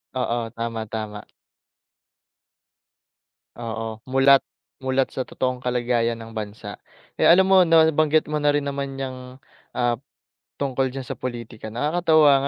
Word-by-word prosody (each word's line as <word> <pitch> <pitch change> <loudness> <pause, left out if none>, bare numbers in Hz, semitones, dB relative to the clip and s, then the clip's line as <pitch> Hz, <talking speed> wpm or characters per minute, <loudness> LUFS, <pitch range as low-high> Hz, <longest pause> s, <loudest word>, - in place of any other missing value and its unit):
Oo, 120 -2 -1
tama, 115 -1 -3
tama. 105 -2 -5 2.4
Oo, 110 -1 -5
mulat, 135 +1 +5 0.4
mulat 130 0 0
sa 130 - -4
totoong 130 -1 -2
kalagayan 120 -2 0
ng 115 - -11
bansa. 105 -1 -7 0.4
Eh, - - +5
alam 185 +3 +7
mo 185 -2 +6
'no 165 -1 +6
nabanggit 155 -1 +2
mo 150 - 0
na 145 - 0
rin 145 - 0
naman 140 -1 -4
'yang, 130 -1 -6 0.4
ah, 120 -1 +1 0.6
tungkol 135 -2 0
diyan 130 -2 -7
sa - - -4
pulitika, 115 -3 -6
nakakatuwa 155 +1 +4
130 Hz, 130 wpm, -23 LUFS, 115-140 Hz, 2.4 s, alam